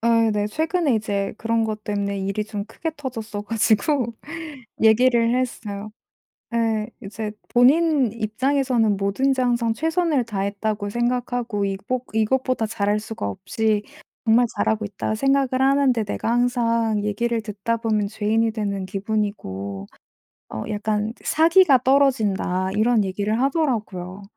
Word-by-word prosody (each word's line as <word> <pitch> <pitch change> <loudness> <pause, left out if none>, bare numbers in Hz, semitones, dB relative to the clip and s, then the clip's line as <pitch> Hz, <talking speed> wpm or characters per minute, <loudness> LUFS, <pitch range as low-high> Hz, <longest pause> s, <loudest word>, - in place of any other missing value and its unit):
아 230 -1 +3
네 205 0 0
최근에 315 - 0
이제 205 -2 -1
그런 230 0 +1
것 215 -1 -4
때문에 200 -1 -2
일이 195 +2 -2
좀 210 -1 -5
크게 325 - -4
터졌어 225 -7 -5
가지고 230 +3 +1 0.7
얘기를 230 +1 +4
했어요. 215 -4 -4 0.6
예. 225 -1 0
이제 210 +1 -5 0.2
본인 275 0 +4
입장에서는 235 0 +1
"뭐든지 260 +8 +1
항상 235 -2 +1
최선을 320 0 +1
다했다고 205 0 -2
생각하고 240 -2 -1
이것 200 +6 -2
이것보다 250 +2 +1
잘할 210 -1 0
수가 220 - -5
없이 215 - -1 0.4
정말 230 +2 +5
잘하고 220 0 +1
있다 205 +1 -3
생각을 270 +1 +1
하는데 270 -4 +3
내가 215 +2 -2
항상 230 -3 +1
얘기를 230 +3 -1
듣다 215 +2 -2
보면 215 -3 0
죄인이 220 +2 0
되는 200 -3 -3
기분이고 185 - -3 0.6
어 110 - -4
약간 210 +1 -1
그 - - -22
사기가 325 -3 +5
떨어진다." 220 -9 +2
이런 215 +1 +3
얘기를 205 +4 -1
하더라고요. 215 - -1
220 Hz, 300 characters per minute, -23 LUFS, 205-245 Hz, 0.7 s, 정말